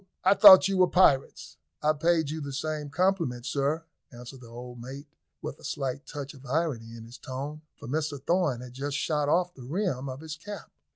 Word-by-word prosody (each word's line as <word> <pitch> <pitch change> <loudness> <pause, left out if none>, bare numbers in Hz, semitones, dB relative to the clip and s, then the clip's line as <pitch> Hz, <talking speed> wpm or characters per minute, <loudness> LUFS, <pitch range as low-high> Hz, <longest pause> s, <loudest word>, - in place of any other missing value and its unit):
I 190 - +6
thought 195 -2 +9
you 195 -1 0
were 185 -1 +5
pirates." 140 -7 +2 0.3
"I 155 +1 +4
paid 160 -1 +1
you 160 0 -4
the 140 -1 -6
same 150 +1 -3
compliment, 160 -7 0
sir," 140 +5 -1 0.3
answered 125 +2 -11
the 120 - -12
old 120 +1 -9
mate, 135 +4 -8 0.4
with - - -6
a - - -18
slight 135 0 -4
touch 145 0 -7
of 135 -2 -15
irony 130 -5 -2
in 115 - -10
his 120 +2 -12
tone, 140 +4 -6 0.2
for - - -10
Mr 145 +1 -2
Thorn 150 -4 0
had 125 -1 -10
just 140 +2 -3
shot 150 -1 0
off 180 +2 +2
the 135 - -13
rim 140 -1 -2
of 130 +2 -7
his 160 -1 -6
cap. 205 +5 -9
145 Hz, 205 wpm, -28 LUFS, 130-160 Hz, 0.4 s, thought